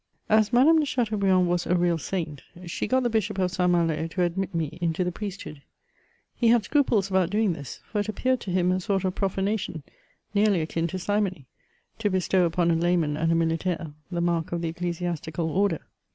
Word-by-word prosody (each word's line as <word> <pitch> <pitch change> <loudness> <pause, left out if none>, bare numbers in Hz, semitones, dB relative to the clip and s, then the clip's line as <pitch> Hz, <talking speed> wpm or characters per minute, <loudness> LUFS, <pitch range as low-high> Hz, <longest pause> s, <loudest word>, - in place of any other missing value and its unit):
As 215 0 +4
Madame 285 +7 +6
de 305 - +1
Chateaubriand 200 -8 +2
was 175 0 0
a 180 - +2
real 175 -1 +2
Saint, 160 -5 -4 0.2
she 170 - -3
got 260 0 +2
the - - +2
bishop 210 -2 0
of 185 -1 +1
Saint 180 -1 +1
Malo 165 -2 +1
to 180 +2 -1
admit 180 +2 -2
me 165 0 -3
into 170 +1 0
the 180 - -1
priesthood; 195 -7 -7 0.7
he 235 - +1
had 230 -1 +5
scruples 230 -6 +2
about 185 -2 +2
doing 210 -1 +1
this; 140 -5 -8
for 210 - -3
it 205 +1 -2
appeared 255 +4 0
to 200 - -7
him 180 0 +2
a 185 - +1
sort 195 +1 -1
of 185 - 0
profa* 195 -1 -1
nation, 200 -6 -2 0.5
nearly 205 -2 +3
akin 165 +1 -1
to 185 - -4
simony, 190 -5 -1 0.5
to 210 -2 +1
bestow 185 -1 +2
upon 170 0 +1
a - - +3
layman 165 -3 +1
and 165 +2 +1
a - - +3
militaire 165 -1 -1 0.2
the 175 -2 -2
mark 170 -2 0
of 170 0 -2
the 165 - 0
ecclesiastical 170 -1 -3
order. 200 +3 +1
180 Hz, 205 wpm, -26 LUFS, 170-205 Hz, 0.7 s, Madame